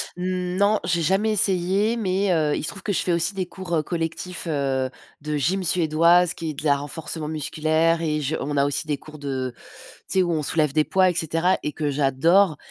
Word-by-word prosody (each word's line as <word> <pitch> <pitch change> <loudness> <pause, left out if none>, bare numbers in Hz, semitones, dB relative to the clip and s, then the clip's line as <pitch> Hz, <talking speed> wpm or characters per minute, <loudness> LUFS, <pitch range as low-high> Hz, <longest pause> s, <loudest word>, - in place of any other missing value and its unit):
Non, 185 +3 0
j'ai 170 -1 +1
jamais 195 +7 +2
essayé, 195 +3 +1
mais, 195 -2 0
heu, 155 -3 +1
il - - -3
se - - 0
trouve 195 - -9
que 205 - -1
je - - +1
fais 180 - -1
aussi 170 +4 0
des 190 -1 -2
cours, 180 -1 -5
heu, 155 - +1
collectifs, 170 +2 -4
heu, 135 -4 -1 0.3
de 150 0 -2
gym 185 +7 0
suédoise 170 +1 +3
qui 165 -2 -5
est - - -7
de 145 - -7
la 145 -2 +3
renforcement 150 +2 -5
musculaire 155 +2 0
et 155 -2 -1
je 150 +2 -1
on 145 +2 -3
a 140 - +3
aussi 145 +2 -1
des 145 - -1
cours 155 +2 -13
de 130 -3 -3 0.6
tu 190 - +2
sais 185 - +5
où 175 - -1
on 155 -2 -1
soulève 150 -2 +1
des 155 - +3
poids 185 +3 +3
et - - -1
cetera 165 +3 +1
et 150 - -2
que 150 0 -2
j'adore 150 +6 +3
165 Hz, 220 wpm, -23 LUFS, 150-185 Hz, 0.6 s, sais